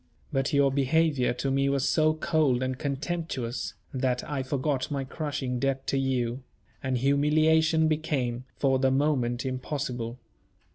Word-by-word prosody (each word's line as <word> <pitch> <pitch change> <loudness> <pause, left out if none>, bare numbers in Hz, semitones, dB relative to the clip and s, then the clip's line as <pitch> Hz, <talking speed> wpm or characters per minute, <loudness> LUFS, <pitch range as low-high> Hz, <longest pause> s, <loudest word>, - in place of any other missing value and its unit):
But 135 +1 +1
your 140 -1 +4
behaviour 140 0 +2
to 130 +2 -2
me 135 +1 +2
was 140 -1 +1
so 155 -1 +3
cold 155 -6 +1
and 130 0 -1
contemptuous, 140 -3 -3 0.2
that 130 -2 -1
I 145 -2 -2
forgot 130 0 -1
my 140 -2 -2
crushing 135 -3 -3
debt 135 0 -1
to 135 - 0
you; 130 -2 -1 0.4
and 130 -1 0
humiliation 155 +4 +3
became, 135 -6 -1
for 135 -2 +2
the 135 0 +3
moment, 130 -3 +1
impossible. 130 -2 -3
135 Hz, 140 wpm, -27 LUFS, 130-150 Hz, 0.4 s, your